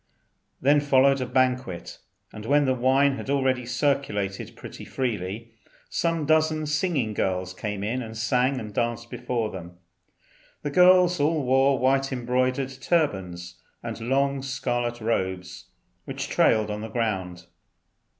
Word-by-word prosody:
Then 145 +3 +4
followed 135 -1 +3
a 125 - -2
banquet, 125 -7 -1 0.3
and 110 0 -8
when 145 +2 +4
the 130 - +2
wine 135 +2 +2
had - - -7
already 130 -3 +1
circulated 120 -7 -1
pretty - - -10
freely, 115 -2 -4 0.4
some 165 -2 0
dozen 155 0 +2
singing 150 - 0
girls 95 -2 -1
came 105 +1 -4
in 120 +5 -1
and 110 -1 -7
sang 125 +4 +1
and 105 -3 -8
danced 120 +1 -2
before 115 -4 -2
them. 90 -1 -9 0.9
The 145 - -2
girls 180 +1 +5
all 150 +1 +1
wore 135 +1 +3
white 135 +2 +1
embroidered 130 +1 0
turbans, 95 - -1 0.2
and - - -6
long 140 0 +1
scarlet 120 -3 -2
robes 95 -5 -2 0.4
which - - -5
trailed 110 -1 +3
on 105 0 -4
the 110 - -6
ground. 95 -7 -3
125 Hz, 135 wpm, -25 LUFS, 110-140 Hz, 0.9 s, girls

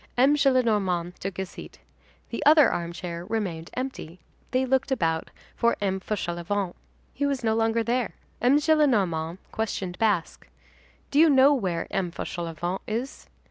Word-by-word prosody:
M. 270 +4 +5
Gillenormand 210 -11 +2
took 195 -1 -5
his 190 -1 -4
seat. - - -11 0.5
The - - -3
other 300 0 +7
armchair 170 0 -4
remained 180 -5 -3
empty. 250 -10 -5 0.3
They 255 +1 +1
looked 265 +1 +1
about 165 -10 0 0.3
for 235 0 +2
M. 190 -1 -1
Fauchelevent. 185 -1 -3 0.4
He 285 +1 0
was 275 -3 -2
no 220 -1 +2
longer 225 +1 +1
there. 245 +1 -1 0.3
M. 255 +4 +5
Gillenormand 210 - +2
questioned 195 -5 -3
Basque. 205 -7 0 0.6
"Do 285 - +3
you 325 0 +7
know 275 0 +6
where 185 -11 -1
M. 195 -3 -1
Fauchelevent 175 +1 -4
is?" 240 +6 -4
215 Hz, 140 wpm, -26 LUFS, 175-260 Hz, 0.6 s, other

